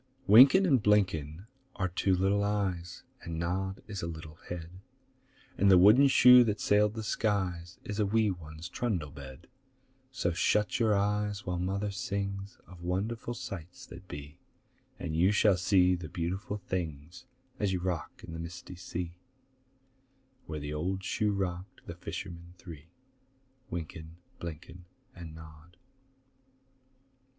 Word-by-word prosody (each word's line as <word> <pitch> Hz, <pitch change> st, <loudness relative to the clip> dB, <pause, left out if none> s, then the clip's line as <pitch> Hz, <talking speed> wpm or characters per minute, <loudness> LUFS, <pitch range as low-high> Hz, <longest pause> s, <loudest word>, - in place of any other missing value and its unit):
Wynken 135 Hz, -, +8 dB
and 135 Hz, -9 st, +4 dB
Blynken 95 Hz, -5 st, +1 dB, 0.3 s
are 95 Hz, -, 0 dB
two 95 Hz, +1 st, +1 dB
little 100 Hz, +2 st, +2 dB
eyes, 95 Hz, -4 st, -2 dB, 0.2 s
And 85 Hz, -1 st, -5 dB
Nod 95 Hz, +3 st, -2 dB
is 100 Hz, -3 st, -6 dB
a 85 Hz, -, -3 dB
little 80 Hz, -1 st, -8 dB
head, 90 Hz, +1 st, -7 dB, 0.8 s
And 100 Hz, -, +5 dB
the 95 Hz, -, +8 dB
wooden 110 Hz, +10 st, +7 dB
shoe 125 Hz, -2 st, +8 dB
that 105 Hz, -2 st, -1 dB
sailed 105 Hz, +1 st, +3 dB
the 110 Hz, -, -4 dB
skies 95 Hz, -5 st, -1 dB
Is 105 Hz, 0 st, -5 dB
a 105 Hz, -, +3 dB
wee 110 Hz, 0 st, +2 dB
one's 80 Hz, -2 st, -8 dB
trundle 90 Hz, -8 st, -2 dB
bed; 70 Hz, +4 st, -11 dB, 0.7 s
So 90 Hz, -9 st, -1 dB
shut 105 Hz, +7 st, +1 dB
your 110 Hz, -3 st, +3 dB
eyes 105 Hz, 0 st, 0 dB
while 90 Hz, -1 st, -2 dB
Mother 100 Hz, +3 st, -1 dB
sings 100 Hz, 0 st, -4 dB
Of 90 Hz, -2 st, -14 dB
wonderful 105 Hz, +7 st, -2 dB
sights 95 Hz, -9 st, -8 dB
that 90 Hz, +3 st, -12 dB
be, 75 Hz, +2 st, -9 dB, 0.6 s
And 80 Hz, -, -4 dB
you 90 Hz, +5 st, +4 dB
shall 105 Hz, -1 st, +4 dB
see 90 Hz, 0 st, +3 dB
the 85 Hz, -3 st, -4 dB
beautiful 90 Hz, +6 st, -3 dB
things 85 Hz, -, -5 dB, 0.3 s
As 105 Hz, -2 st, +1 dB
you 90 Hz, -, 0 dB
rock 90 Hz, -2 st, -4 dB
on 80 Hz, -, -8 dB
the 80 Hz, -, -6 dB
misty 85 Hz, +2 st, -8 dB
sea 85 Hz, -1 st, -5 dB, 1.3 s
Where 75 Hz, -1 st, -4 dB
the 75 Hz, +1 st, -5 dB
old 95 Hz, +5 st, -2 dB
shoe 105 Hz, +1 st, 0 dB
rocked 95 Hz, -1 st, -4 dB
the -, -, -6 dB
fishermen 85 Hz, +1 st, -8 dB
three, 80 Hz, -3 st, -11 dB, 0.8 s
Wynken, 80 Hz, -1 st, -6 dB, 0.2 s
Blynken, 85 Hz, +2 st, -8 dB, 0.3 s
And 85 Hz, -3 st, -10 dB
Nod. 80 Hz, +2 st, -14 dB
90 Hz, 140 wpm, -30 LUFS, 85-100 Hz, 1.3 s, Wynken